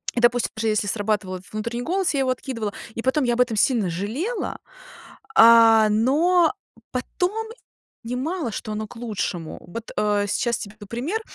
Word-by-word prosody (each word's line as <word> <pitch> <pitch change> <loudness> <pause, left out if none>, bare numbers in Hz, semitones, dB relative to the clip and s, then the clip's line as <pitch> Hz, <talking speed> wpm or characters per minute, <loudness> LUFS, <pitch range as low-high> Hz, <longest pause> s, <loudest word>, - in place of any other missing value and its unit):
и - - +1
допустим, 240 0 +3
даже 220 +1 -2
если 215 -1 +1
срабатывал 205 -2 -1
этот 185 +2 -16
внутренний 235 +3 -3
голос, 370 +3 0
я 280 - 0
его 265 -1 +1
откидывала 230 -5 -3 0.2
и - - -3
потом 260 +4 +1
я 240 - +2
об 245 - +2
этом 245 -3 +1
сильно 220 -4 +2
жалела, 230 - -3 0.8
а, 225 - +8
но 315 - +3 0.4
потом 370 - -2 0.6
понимала 255 +4 -3
что 215 +1 -5
оно 215 +1 -3
к 245 - -14
лучшему. 200 -8 -4
Вот, 230 +6 -7
э, 205 -1 +2
сейчас 235 +3 0
тебе 205 -1 -8
п 210 - -11
пример. 290 - -3
230 Hz, 170 wpm, -23 LUFS, 215-265 Hz, 0.8 s, а